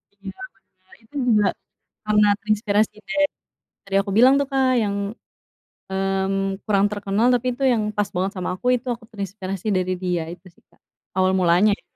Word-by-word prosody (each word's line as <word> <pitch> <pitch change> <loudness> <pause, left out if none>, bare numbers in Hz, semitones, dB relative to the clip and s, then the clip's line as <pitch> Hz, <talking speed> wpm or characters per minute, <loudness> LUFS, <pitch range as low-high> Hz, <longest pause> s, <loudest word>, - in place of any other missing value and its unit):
Iya 200 -1 -8 0.5
bener, 185 0 -22
itu 225 - -27
juga 210 -3 +4 0.6
karena 210 0 +4
terinspirasi 215 0 +1 0.2
dari 295 -1 +2 0.6
tadi 195 0 -1
aku 195 - -6
bilang 255 +3 +7
tuh 280 - 0
Kak, 265 -1 +2
yang 200 -1 -1 1.0
mmm 195 0 -1
kurang 200 -2 +3
terkenal, 205 +2 0
tapi 245 +1 -1
itu 255 - -7
yang 225 -3 +1
pas 205 -1 +1
banget 185 +2 -1
sama 185 - -3
aku, 245 - -9
itu 250 +2 -10
aku 230 - -15
terinspirasi 195 -1 -6
dari 185 0 0
dia, 180 -2 0
itu 180 +2 -13
sih - - -29
Kak. - - -30 0.4
Awal 185 0 +3
mulanya 185 +3 +4
ya. - - -26
200 Hz, 170 wpm, -22 LUFS, 190-220 Hz, 1.0 s, bilang